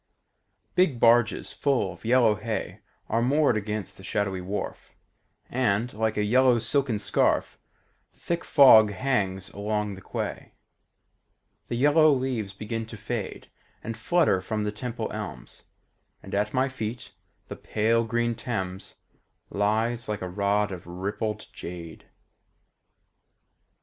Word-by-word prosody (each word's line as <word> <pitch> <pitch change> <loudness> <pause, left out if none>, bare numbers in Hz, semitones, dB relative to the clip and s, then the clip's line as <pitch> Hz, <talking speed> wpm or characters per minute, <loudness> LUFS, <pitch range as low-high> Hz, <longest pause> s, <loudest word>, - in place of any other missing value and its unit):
Big 160 -10 +2
barges 115 0 +3
full 125 -10 0
of - - -18
yellow 115 -1 +4
hay 110 +1 -4 0.3
Are 115 +2 +1
moored 140 +1 +3
against 105 -2 -3
the 95 - -13
shadowy 95 -2 -1
wharf, 95 +3 -5 0.5
And, 120 -1 0
like 110 0 -1
a 105 - +2
yellow 125 +3 +4
silken 130 -1 0
scarf, 100 - +1 0.5
The - - -33
thick 170 0 -2
fog 120 -7 +7
hangs 95 -5 -1
along 105 0 -2
the 95 - -10
quay. - - -5 1.1
The - - -3
yellow 150 +4 +5
leaves 130 -7 -1
begin 110 +3 -5
to 115 - -9
fade 110 -1 -5 0.3
And 115 - -4
flutter 130 - +2
from 105 +3 -2
the 105 - -1
Temple 115 +1 -5
elms, 105 -3 -8 0.6
And - - -10
at 105 +1 0
my 130 +1 +2
feet 120 -3 -6 0.4
the - - -6
pale 115 +2 +1
green 120 +1 0
Thames 95 -6 -5 0.6
Lies 110 +3 0
like 105 -3 -3
a - - -3
rod 100 +2 0
of 90 -2 -8
rippled 100 +5 -3
jade. 85 -2 -8
110 Hz, 130 wpm, -26 LUFS, 100-120 Hz, 1.1 s, fog